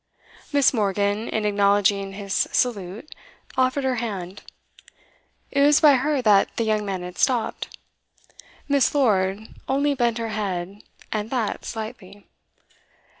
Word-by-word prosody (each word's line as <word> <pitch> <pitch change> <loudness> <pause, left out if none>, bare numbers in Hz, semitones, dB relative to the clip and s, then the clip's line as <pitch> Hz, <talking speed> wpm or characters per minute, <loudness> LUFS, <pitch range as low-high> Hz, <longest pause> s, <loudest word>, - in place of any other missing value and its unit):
Miss. 285 -2 +4
Morgan, 205 0 0
in 215 -1 -1
acknowledging 200 -1 +2
his 200 0 -5
salute, 215 - -1 0.4
offered 260 +2 +1
her 260 -1 0
hand; 195 -5 -5 1.1
it 280 - +1
was 290 +1 +6
by 300 -3 +7
her 280 0 0
that 205 -3 +4
the 230 - +1
young 215 -1 0
man 190 -3 -4
had 180 0 -9
stopped. 245 -4 -1 0.9
Miss. 280 -1 +2
Lord 200 -7 +2 0.3
only 285 +2 +2
bent 240 -3 0
her 230 -1 -3
head, 200 -2 -4 0.3
and 215 0 -2
that 235 -5 -2
slightly. 215 -3 -8
215 Hz, 125 wpm, -23 LUFS, 200-255 Hz, 1.1 s, by